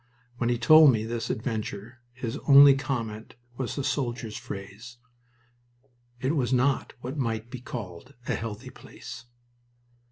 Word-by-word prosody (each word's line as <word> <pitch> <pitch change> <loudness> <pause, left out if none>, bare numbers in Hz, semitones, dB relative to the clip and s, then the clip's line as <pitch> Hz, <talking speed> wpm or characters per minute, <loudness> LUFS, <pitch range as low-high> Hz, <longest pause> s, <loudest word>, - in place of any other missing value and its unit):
When 120 -1 0
he 120 - +1
told 155 +5 +7
me 110 -3 -1
this 115 0 -4
adventure 110 0 -4
his 120 -2 -5
only 140 0 +9
comment 115 -6 -4 0.2
was 130 -1 -4
the 140 - -3
soldier's 120 -5 -2
phrase, 105 +5 -9 1.2
"It 135 +5 0
was 125 -5 0
not 130 +2 +1
what 130 +5 -6
might 115 -2 -3
be 130 - -6
called 120 0 -8
a - - 0
'healthy' 115 +3 -6
place." 120 +1 -11
120 Hz, 135 wpm, -27 LUFS, 110-130 Hz, 1.2 s, only